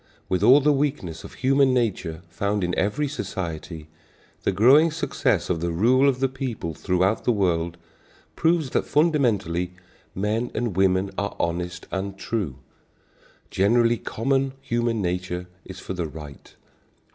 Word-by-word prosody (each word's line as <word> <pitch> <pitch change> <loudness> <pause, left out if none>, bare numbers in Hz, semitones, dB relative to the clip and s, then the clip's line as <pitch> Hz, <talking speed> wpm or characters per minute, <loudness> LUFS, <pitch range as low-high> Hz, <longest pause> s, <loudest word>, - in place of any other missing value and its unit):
With 95 -1 0
all 130 +7 +7
the 150 +1 +4
weakness 135 - -2
of - - -11
human 135 0 +3
nature 95 -8 -1
found 100 +4 -1
in 90 0 -1
every 120 +10 0
society, 85 - -5 0.5
the - - +1
growing 140 +10 +6
success 160 +1 0
of 85 -3 -1
the 85 - -1
rule 125 +11 +4
of 130 -1 -2
the 135 - +4
people 130 - -4
throughout 95 +5 0
the - - +2
world 85 -5 0 0.6
proves 160 -5 +1
that - - 0
fundamentally 115 - +1 0.4
men 110 +5 -1
and 115 -4 -2
women 95 0 +2
are 100 0 -3
honest 85 +1 -2
and 95 0 -3
true. 95 - -3 1.0
Generally 115 +4 +3
common 135 +3 -1
human 120 -5 -1
nature 90 0 -2 0.2
is 95 -1 -9
for 95 - -6
the 90 -3 -3
right. 75 -2 -11
100 Hz, 145 wpm, -24 LUFS, 90-130 Hz, 1.0 s, all